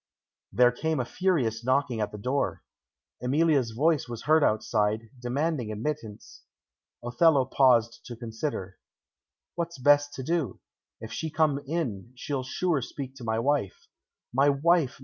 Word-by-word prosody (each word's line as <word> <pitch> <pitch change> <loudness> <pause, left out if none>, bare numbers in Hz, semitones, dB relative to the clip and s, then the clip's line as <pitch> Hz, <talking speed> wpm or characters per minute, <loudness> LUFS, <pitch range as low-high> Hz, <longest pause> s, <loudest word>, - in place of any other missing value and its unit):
There 125 0 +5
came 160 +4 -2
a 125 - -1
furious 125 - 0
knocking 130 -2 +1
at 105 -1 -2
the 105 - -7
door. 130 +6 -2 0.6
Emilia's 140 -1 +2
voice 145 +5 +1
was 120 -2 -6
heard 155 +1 +4
outside, 110 0 0
demanding 130 -1 -1
admittance. 110 - -5 0.6
Othello 135 +3 +3
paused 120 -3 +3
to 120 - -7
consider. 115 -4 -5 0.7
"What's 170 -1 -4
best 145 +2 +3
to 130 - -5
do? 165 -2 -1 0.4
If 110 - -7
she 160 - -3
come 155 -2 +1
in, 125 - -3
she'll 135 +1 -3
sure 150 +3 -1
speak 130 +2 -7
to 125 - -10
my 110 -1 -1
wife. 130 -5 -1 0.5
My 135 +3 +4
wife! 145 -1 +2
130 Hz, 140 wpm, -27 LUFS, 115-150 Hz, 0.7 s, There